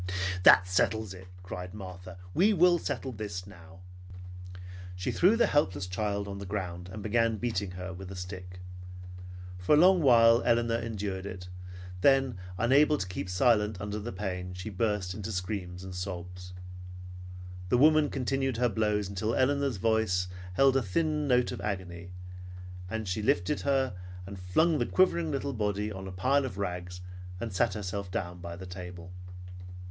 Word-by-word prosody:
"That 90 0 +8
settles 105 +3 +1
it!" 95 0 -12 0.2
cried 90 +1 -7
Martha. 90 -2 -9 0.2
"We 205 +5 +4
will 175 -1 +5
settle 135 -3 -3
this 100 -5 -5
now!" 90 -1 -14 1.1
She 90 - -2
threw 195 +6 +4
the 235 - +5
helpless 100 -10 +1
child 100 +2 -2
on 100 0 -6
the 100 - -6
ground 90 -3 -4
and 105 +1 -7
began 115 +1 +1
beating 100 -4 -2
her 90 +1 -6
with 95 +2 -8
the 95 - -8
stick. 90 0 -8 1.0
For 90 +11 +4
a - - +4
long 180 +2 +6
while 115 -4 +6
Elinor 115 -1 +2
endured 100 -4 -4
it, 90 -1 -8 0.5
then 135 -5 +3 0.2
unable 140 +7 +4
to 95 - -3
keep 90 0 -5
silent 105 0 +2
under 105 +1 -4
the 110 +3 -5
pain, 90 -2 -4
she 90 +4 -6
burst 105 -2 -1
into 105 +2 -5
screams 90 -2 -4
and 95 0 -7
sobs. 90 -1 -6 1.2
The 125 - +4
woman 155 +2 +5
continued 135 -1 -1
her 125 0 +2
blows 105 -1 0
until 105 +4 -2
Elinor's 140 -2 +1
voice 110 -4 +1 0.3
held 135 +6 +4
a 135 - +4
thin 150 - 0
note 125 -2 +3
of - - -6
agony, 95 -3 -5 0.8
and 110 0 -3
she 90 +4 -1
lifted 105 +6 +1
her 135 -4 +1 0.3
and 100 0 -8
flung 155 - +2
the - - 0
quivering 170 -3 +2
little 140 -1 -2
body 105 -1 -1
on 95 -1 -7
a - - -6
pile 130 +10 +2
of 120 -7 -6
rags, 90 -2 -4 0.4
and 115 -1 -4
sat 100 +1 +1
herself 100 -1 -4
down 90 -1 -4
by 85 -1 -7
the 95 +2 -9
table. 90 -1 -8
100 Hz, 165 wpm, -29 LUFS, 90-120 Hz, 1.2 s, That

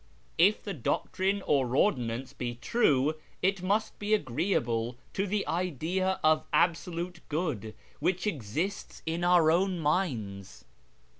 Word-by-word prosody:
If 200 +5 +5
the 200 - -4
doctrine 190 - -1
or 130 -3 +1
ordinance 125 - +1
be 120 -1 -4
true, 155 - +2 0.3
it 195 0 +2
must 200 +4 0
be 210 +1 +2
agreeable 120 - -1 0.2
to 195 +1 -1
the 205 +1 0
idea 180 +2 -1
of 155 0 +4
Absolute 170 0 0
Good 145 - -2 0.2
which 180 +5 0
exists 165 - -3
in 165 +2 -2
our 175 -3 +5
own 185 +2 +2
minds." 125 - -2
170 Hz, 125 wpm, -29 LUFS, 130-190 Hz, 0.3 s, If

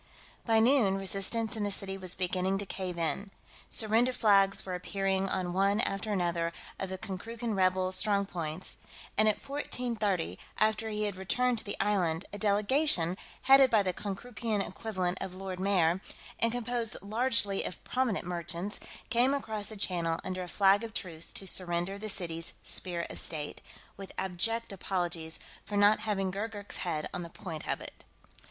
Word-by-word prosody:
By 225 -1 +5
noon, 225 -5 +4
resistance 195 +4 -1
in 220 - -3
the 205 - 0
city 195 -1 -3
was 185 -2 0
beginning 185 +1 0
to 200 - -2
cave 185 -2 -4
in. 170 +5 -1 0.4
Surrender 225 +3 +3
flags 200 -4 +4
were 185 - -4
appearing 195 +1 0
on 180 -2 -1
one 200 +2 +3
after 200 +2 -1
another 170 -3 0 0.3
of 195 - -3
the 190 - -4
Konkrookan 220 +4 -4
rebel 185 0 +2
strong 200 +1 +3
points, 170 -2 -4 0.4
and 215 +1 +5
at 210 - +3
1430, 230 - -1 0.2
after 220 +1 +2
he 210 0 -1
had 205 -2 -1
returned 245 +5 +1
to - - -6
the 205 - -5
Island, 190 -4 +1
a 205 - -5
delegation, 205 - +3 0.3
headed 270 0 +8
by 220 -3 +4
the 185 -1 0
Konkrookan 215 +1 -3
equivalent 185 -5 -2
of 190 -1 -4
Lord 190 -1 -5
Mayor 185 -2 +3 0.4
and 230 - +4
composed 240 -1 0
largely 215 -2 +1
of - - -6
prominent 250 -8 0
merchants, 175 +3 -4 0.3
came 250 +4 +4
across 220 -7 -2
the 215 - -6
channel 170 -4 0
under 185 0 -3
a 180 - -5
flag 200 +3 +4
of 225 -2 -7
truce 170 -3 -3
to 195 - -2
surrender 180 +1 0
the 215 +1 -4
city's 170 -3 0
Spear 175 -2 +3
of - - -2
State, 150 -2 -3 0.4
with 195 -1 -9
abject 225 +5 +1
apologies 175 -4 -2 0.3
for 205 - -3
not 205 +1 +6
having 200 -3 -1
Gurgurk's 205 +1 -5
head 160 -4 -2
on 180 - -3
the 170 - -6
point 165 -2 -7
of - - -1
it. - - -10
195 Hz, 170 wpm, -31 LUFS, 180-220 Hz, 0.4 s, headed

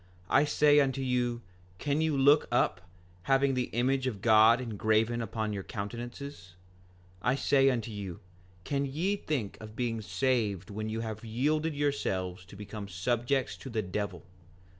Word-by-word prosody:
I 145 +2 +5
say 150 0 +5
unto 135 -1 +1
you, 120 -2 0 0.3
can 145 +6 0
you 160 -3 +1
look 145 +3 +5
up, 110 -6 +2 0.5
having 135 0 +4
the 125 -1 0
image 130 +3 +1
of 110 -6 -3
God 110 +2 +6
engraven 110 0 +1
upon 110 -2 -3
your 100 - -3
countenances? 115 -1 -7 0.7
5:20 - - +2
I 130 - +3
say 135 -1 +4
unto 115 -3 -2
you, 100 -3 -6 0.4
can 140 +5 -1
ye 170 +9 0
think 140 - -3
of 110 0 -10
being 115 -2 -2
saved 105 -5 -1
when 110 +1 -4
you 110 +1 -3
have 110 -1 -5
yielded 150 +7 0
yourselves 95 -11 -1
to 100 - -13
become 105 0 -7
subjects 120 +8 -1
to 135 - -9
the 110 -3 -1
devil? 95 -2 -4
120 Hz, 160 wpm, -30 LUFS, 105-135 Hz, 0.7 s, God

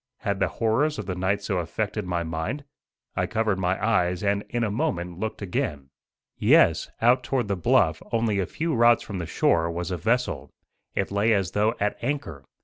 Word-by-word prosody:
Had 100 -1 -1
the 95 - +2
horrors 120 - 0
of - - -4
the 95 - -3
night 95 +3 -1
so 95 -3 -1
affected 105 +3 -3
my 85 -1 -1
mind? 80 - -3 0.5
I - - 0
covered 110 -3 0
my 95 0 +1
eyes, 90 -4 +1
and 100 0 +1
in 120 -1 -1
a 110 - 0
moment 90 - -2
looked 110 -1 -4
again. 90 - -3 0.5
Yes, - - +4
out 125 +2 +5
toward 130 -5 -1
the 100 - 0
bluff, 90 - +2
only 110 -3 +1
a 95 - -1
few 160 - -2
rods 120 -1 +5
from 100 -3 -5
the 85 - -4
shore, 85 0 +2
was 85 +2 -4
a 90 - -1
vessel. 120 +7 -1 0.5
It - - -1
lay 105 +3 +3
as 95 -4 0
though 105 +3 +1
at 105 0 -1
anchor. 120 - -3
100 Hz, 195 wpm, -25 LUFS, 90-115 Hz, 0.5 s, out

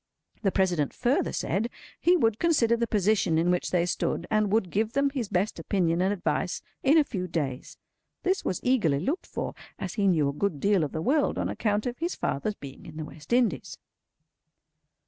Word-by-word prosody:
The 195 - +2
President 175 -7 +1
further 255 +3 +1
said, 210 +7 -1 0.3
he 355 +1 +4
would 225 -7 +2
consider 265 -9 +3
the 235 0 -1
position 205 -5 +2
in 170 +2 +3
which 180 - 0
they 175 -2 +2
stood, 175 - -1
and 215 -2 +2
would 200 -5 +1
give 220 +2 0
them 280 0 +2
his 250 -7 -3
best 185 +4 0
opinion 175 -4 +1
and 190 +2 +2
advice 185 -1 -1 0.2
in 285 +4 +5
a 310 - +6
few 190 -9 -4
days. 140 -7 -3 0.5
This 375 +1 +1
was 185 - -1
eagerly 210 - +2
looked 290 - -2
for, - - -4 0.2
as 190 - -5
he 205 -3 +1
knew 160 -6 +3
a 140 - -1
good 160 -1 -1
deal 200 0 +3
of 145 - -2
the 160 - -3
world 285 - +2
on - - -1
account 210 -1 0
of 245 0 -3
his 340 +2 -2
father's 200 +10 -2
being 140 -6 -11
in 155 - -10
the 155 - -4
West 150 +3 -13
Indies. 235 - +1
200 Hz, 200 wpm, -27 LUFS, 170-235 Hz, 0.5 s, a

